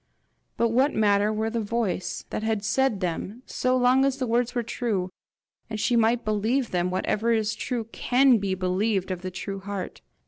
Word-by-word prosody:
But 235 - +2
what 260 +5 +2
matter 205 -1 +3
where 220 +1 -1
the 235 - -1
voice 205 -5 -2
that - - -2
had 220 -2 -1
said 230 -2 +1
them, 185 +7 -3
so 255 0 0
long 255 +1 +4
as 270 -1 +1
the 260 - -1
words 240 +1 0
were 240 - 0
true, 210 -6 -2 0.6
and 215 -1 -4
she 240 +3 +1
might 230 +1 +2
believe 220 +4 0
them! 180 0 0
Whatever 215 +5 0
is 220 -1 +1
true 245 -3 -3
CAN 255 -1 +4
be 195 -1 -1
believed 190 +1 0
of 180 -1 -4
the 185 - -4
true 195 +2 -5
heart. 195 -1 -6
220 Hz, 185 wpm, -26 LUFS, 195-245 Hz, 0.6 s, long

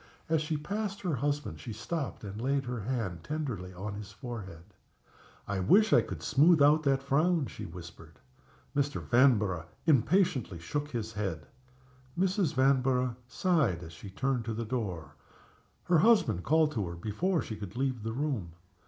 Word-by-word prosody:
As 160 -1 +2
she 155 0 -1
passed 200 +5 -3
her 180 -4 -1
husband 145 +2 -2
she 120 - -7
stopped 135 +6 -4
and 105 +2 -6
laid 135 +1 0
her 125 -1 -3
hand 105 -7 -3
tenderly 125 - -4
on 95 +3 -6
his 105 0 -8
forehead. 105 -8 -8 0.8
"I 100 -1 -1
wish 205 - +5
I - - +7
could - - -7
smooth 160 +4 +5
out 145 +2 +6
that 135 -2 +1
frown!" 155 +3 +2
she - - -7
whispered. 85 0 -11 0.6
Mr. 145 +1 0
Vanborough 105 - +3 0.2
impatiently 145 - +2
shook 145 - -3
his 115 -4 -4
head. 95 -7 -3 0.7
Mrs. 185 -3 +1
Vanborough 130 -2 +2
sighed 140 - +1
as 80 -1 -10
she 100 +4 -10
turned 125 +5 -1
to 115 -1 -3
the 115 +1 -3
door. 100 - -4 0.7
Her 175 -2 +3
husband 155 - +4
called 155 0 +3
to 105 -9 -2
her 85 - -6
before 155 - -1
she 110 - -6
could 100 -2 -8
leave 130 -3 -1
the 110 +1 -3
room. 125 - -2
125 Hz, 160 wpm, -30 LUFS, 100-150 Hz, 0.8 s, I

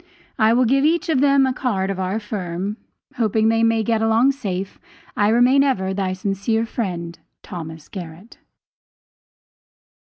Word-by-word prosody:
I 220 +1 +4
will 250 +1 +3
give 270 +4 +2
each 330 +3 +1
of 305 -5 +2
them 280 -1 +4
a 260 - 0
card 195 -8 -1
of 190 - -5
our 190 +3 -1
firm. 200 -1 -4 0.4
Hoping 220 -1 +2
they 225 0 +2
may 225 -1 +2
get 225 0 0
along 225 +4 +3
safe, 195 -8 -5 0.4
I 205 - +2
remain 250 +4 +4
as 270 -4 +2
ever, 190 0 -2
thy 190 -1 -1
sincere 200 +4 -1
friend, 175 -7 -4 0.2
THOS. 160 -3 -8
GARRETT. 180 +3 -10
220 Hz, 155 wpm, -21 LUFS, 190-240 Hz, 0.4 s, I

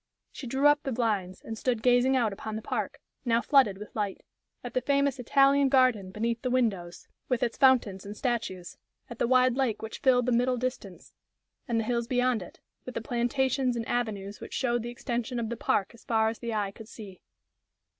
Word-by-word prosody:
She 260 - -8
drew 265 +4 0
up 290 0 +6
the 270 - -3
blinds, 210 -6 -1
and 225 - -6
stood 235 0 -1
gazing 250 +1 +4
out 225 -5 +1
upon 215 +2 -6
the 220 - -4
park, - - -3 0.2
now 230 -2 +2
flooded 255 -7 +3
with 210 +1 -11
light; 205 -3 -3 0.4
at 245 - -7
the 255 - +1
famous 280 0 +1
Italian 275 +2 +4
garden 255 -8 +3
beneath 230 +4 -2
the 255 - -1
windows, 205 -9 -1 0.2
with 250 -3 +1
its 235 - -1
fountains 235 -8 +3
and 205 +1 -8
statues; 230 -8 -3 0.3
at 235 - -8
the - - +2
wide 255 0 +4
lake 240 -6 0
which 220 - -6
filled 250 -2 +3
the 250 - +1
middle 250 +1 +2
distance; 245 -7 -5 0.5
and 235 -2 +1
the - - 0
hills 235 +1 -1
beyond 250 -2 +1
it, 180 - -11 0.2
with 255 - -8
the - - 0
plantations 250 +2 0
and 230 -1 -4
avenues 205 -4 -2
which - - -7
showed 240 -3 0
the 235 - -5
extension 240 0 -3
of 225 -2 -3
the 235 - -3
park 200 -2 0
as 235 - -17
far 220 -1 +2
as 225 - -6
the 235 -1 -4
eye 205 -3 -1
could 220 +2 -12
see. 205 -5 -11
235 Hz, 205 wpm, -28 LUFS, 220-255 Hz, 0.5 s, up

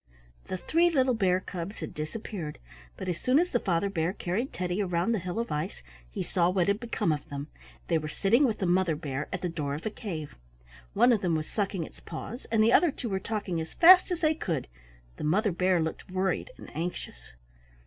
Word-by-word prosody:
The 185 - -3
three 330 - +3
little 260 -5 +3
bears 185 -4 +2
cubs 180 +3 -5
had 160 - -6
disappeared, 155 0 -5 0.4
but - - -6
as 175 -2 -2
soon 255 +2 +3
as 355 +3 +2
the 240 - +2
Father 180 -1 +1
Bear 175 -2 -1
carried 205 +8 -2
Teddy 180 +2 -2
around 180 +2 0
the 225 - +1
hill 180 +2 -5
of 230 +1 -2
ice 150 - -3 0.3
he - - -3
saw 175 -1 +2
what 185 -2 +1
had 200 +1 +2
become 225 -6 -1
of 150 -2 -3
them. 140 +1 -5 0.4
They 165 -2 +2
were 155 - -5
sitting 215 - +3
with 225 -5 0
the 190 - -1
Mother 175 -2 +2
Bear 145 -2 -4
at 185 - -4
the - - +1
door 150 -4 -3
of 150 - -8
a 220 - -1
cave. 160 -10 -6 0.6
One 245 - +5
of 215 - +1
them 175 -3 +1
was 155 -1 -1
sucking 195 -4 -1
its - - -11
paws, 220 - -7
and 220 -1 +4
the 230 +2 +4
other 350 - +6
two 250 -4 -5
were 190 -1 0
talking 195 -5 -2
as 160 - -8
fast 360 +3 +8
as 355 -1 -2
they 310 -1 +4
could. 170 - -3 0.5
The - - -6
Mother 200 +8 +2
Bear 180 +1 +2
looked 160 +2 -3
worried 190 - -1
and - - -12
anxious. 160 - -5
185 Hz, 220 wpm, -29 LUFS, 165-220 Hz, 0.6 s, fast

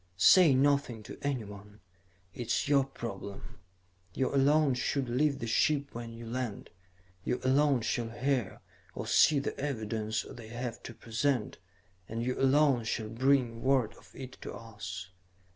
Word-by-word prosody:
"Say 165 - +7
nothing 140 -4 +1
to - - -10
anyone. 105 -6 -5 0.5
It 120 - -6
is 120 - 0
your 140 -2 +4
problem. 100 -8 -8 0.6
You 130 - 0
alone 140 +1 +4
should 130 +1 -1
leave 140 +4 +1
the 125 - -5
ship 140 +5 +1
when 115 0 -6
you 115 0 -9
land; 120 -2 -4 0.5
you 125 - -1
alone 135 0 +3
shall 115 +1 -1
hear 120 -1 -1 0.3
or - - -4
see 150 - +5
the 140 - -2
evidence 110 -5 -2
they 115 -2 -10
have 120 +1 -5
to - - -8
present, 120 +1 -1 0.5
and 115 +1 -3
you 125 +1 0
alone 135 -2 +4
shall 110 -1 -3
bring 120 -1 +1
word 130 -5 +2
of - - -19
it 130 -1 -9
to - - -7
us. 95 -4 -8
125 Hz, 150 wpm, -31 LUFS, 115-140 Hz, 0.6 s, Say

